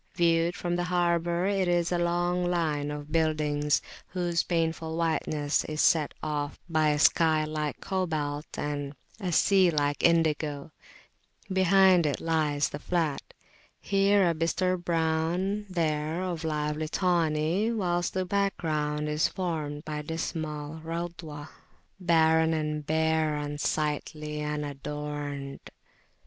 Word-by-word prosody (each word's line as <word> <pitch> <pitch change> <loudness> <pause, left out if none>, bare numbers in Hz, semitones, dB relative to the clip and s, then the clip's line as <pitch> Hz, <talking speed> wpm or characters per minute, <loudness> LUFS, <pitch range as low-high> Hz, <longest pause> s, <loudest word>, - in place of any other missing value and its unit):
Viewed 170 0 +2
from 175 0 -2
the 175 - -1
harbour, 175 0 +1
it 195 -2 +1
is 175 -1 +1
a 175 - +1
long 175 +1 +1
line 155 -4 0
of 150 0 -6
buildings, 150 -2 +1 0.2
whose 175 -2 0
painful 165 -1 -1
whiteness 155 -3 0
is 155 0 -5
set 155 -4 +3
off 150 -1 -3
by 155 -2 +2
a 150 - +2
sky 155 0 +4
like 155 -1 -3
cobalt 155 -6 -2
and 145 -1 -3 0.2
a 185 -4 -2
sea 190 +2 +4
like 145 -2 0
indigo; 155 -3 +1 0.8
behind 190 -2 +5
it 145 - -1
lies 155 -3 +1
the 145 - -6
flat, 160 -2 -1 0.6
here 200 0 +3
of 175 - +4
a 165 -2 -2
bistre 180 +2 +1
brown, 175 +4 0
there 160 -1 -1
of 175 -3 -3
a - - -1
lively 150 0 -1
tawny; 170 +3 +1
whilst 175 -6 -1
the 185 0 0
background 155 -6 -1
is 150 +1 +2
formed 155 -5 -4
by 150 -1 -3
dismal 155 -1 -4
Radhwah, 165 -3 -6 0.5
"Barren 160 -2 +3
and 150 -1 -2
bare, 160 0 +1
unsightly, 150 +1 -2
unadorned." 145 -1 -5
160 Hz, 125 wpm, -28 LUFS, 150-175 Hz, 0.8 s, behind